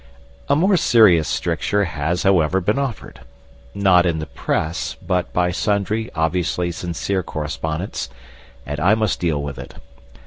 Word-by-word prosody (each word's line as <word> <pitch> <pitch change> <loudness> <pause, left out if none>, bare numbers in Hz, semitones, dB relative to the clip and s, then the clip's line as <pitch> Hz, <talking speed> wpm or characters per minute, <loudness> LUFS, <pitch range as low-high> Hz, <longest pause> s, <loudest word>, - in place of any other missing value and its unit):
A - - +4
more 185 +5 +3
serious 105 - +5
stricture 100 0 0
has, 80 +1 -2
however, 95 -2 +3
been 105 +8 0
offered 135 -6 -5 0.5
not 95 -3 +4
in 85 -2 0
the 80 - -4
press, 80 +4 -2
but 90 0 -2
by 90 0 +1
sundry 105 +3 -1
obviously 85 +2 0
sincere 90 +3 -2
correspondents 80 +3 -4 0.6
and 70 +1 -4
I 95 +7 +4
must 110 -3 0
deal 80 -5 0
with 70 -1 -6
it. - - -10
90 Hz, 140 wpm, -20 LUFS, 80-100 Hz, 0.6 s, serious